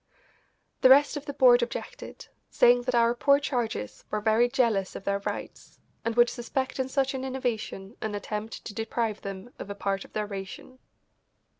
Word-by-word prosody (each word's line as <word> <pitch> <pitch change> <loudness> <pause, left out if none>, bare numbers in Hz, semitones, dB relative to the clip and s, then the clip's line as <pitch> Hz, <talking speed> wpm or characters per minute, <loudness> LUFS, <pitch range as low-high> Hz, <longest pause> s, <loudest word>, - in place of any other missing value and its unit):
The 255 - +7
rest 285 +3 +6
of 290 0 -6
the 285 - -4
board 245 -2 +6
objected, 250 - -6 0.2
saying 245 0 +5
that 250 - +1
our 235 0 +4
poor 280 +3 +4
charges 240 - -3
were 215 - -1
very 220 +3 +3
jealous 230 -8 +1
of - - -7
their 200 0 0
rights, 200 - -7 0.2
and 230 0 -2
would 240 0 +6
suspect 260 +2 -3
in 260 0 -1
such 270 0 0
an 265 -1 -4
innovation 245 -5 -4
an 215 -1 -3
attempt 210 +2 -5
to 210 - -6
deprive 225 0 -2
them 195 +4 -7
of - - -7
a 200 - -5
part 195 -1 -2
of - - -17
their 210 0 -1
ration. 200 +5 -8
235 Hz, 180 wpm, -27 LUFS, 210-260 Hz, 0.2 s, The